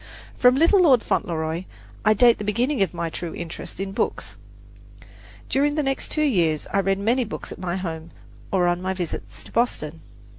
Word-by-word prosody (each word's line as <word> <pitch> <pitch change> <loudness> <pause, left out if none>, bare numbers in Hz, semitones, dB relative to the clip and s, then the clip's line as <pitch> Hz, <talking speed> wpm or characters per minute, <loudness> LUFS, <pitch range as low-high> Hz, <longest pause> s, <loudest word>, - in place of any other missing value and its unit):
From 250 0 +5
"Little 340 +7 +5
Lord 265 -9 +5
Fauntleroy" 160 +1 -1 0.4
I 215 - +4
date 240 +1 +5
the - - -4
beginning 240 +5 0
of 195 - +2
my 170 -1 -3
true 170 -1 -5
interest 170 +1 -7
in 195 0 -3
books. - - -2 1.1
During 290 +2 +1
the 305 - +1
next 270 -1 -2
two 305 - 0
years 170 - +2
I 200 - +3
read 195 0 +1
many 235 +6 +1
books 220 - -7
at - - -8
my 180 -1 -2
home 165 -3 -5 0.4
and 190 -2 +2
on 175 0 +1
my 190 +1 -2
visits 105 - -5
to - - -14
Boston. 165 -10 -1
195 Hz, 185 wpm, -23 LUFS, 170-250 Hz, 1.1 s, From